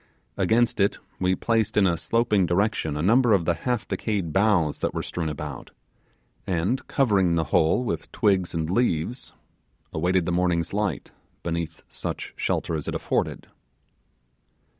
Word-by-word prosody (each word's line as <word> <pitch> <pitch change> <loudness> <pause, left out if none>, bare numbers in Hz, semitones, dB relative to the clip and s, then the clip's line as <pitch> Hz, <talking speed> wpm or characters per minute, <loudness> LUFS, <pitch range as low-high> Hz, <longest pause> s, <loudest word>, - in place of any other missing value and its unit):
Against 115 0 +2
it 100 +1 +2 0.2
we 95 0 +2
placed 110 +1 0
in 100 - +5
a 85 -2 +3
sloping 100 +2 +1
direction 90 -5 0
a 75 - -2
number 115 +4 +4
of 90 -5 +2
the 85 - +3
half 120 +8 -2
decayed 100 -8 -2
boughs 95 -7 +2
that - - -2
were - - -2
strewn 85 -2 -3
about, 75 -2 -6 0.8
and 95 +8 -1
covering 100 -10 +2
the 80 - +2
whole 80 +10 +3
with - - -3
twigs 95 -5 +1
and 80 -1 -1
leaves, 120 +1 -1 0.6
awaited 90 +2 +1
the 90 - -1
morning's 85 -1 0
light 105 -7 -2 0.3
beneath 85 -1 -3
such - - -5
shelter - - -1
as 75 -3 -3
it - - -2
afforded. - - -1
90 Hz, 150 wpm, -25 LUFS, 85-105 Hz, 0.8 s, in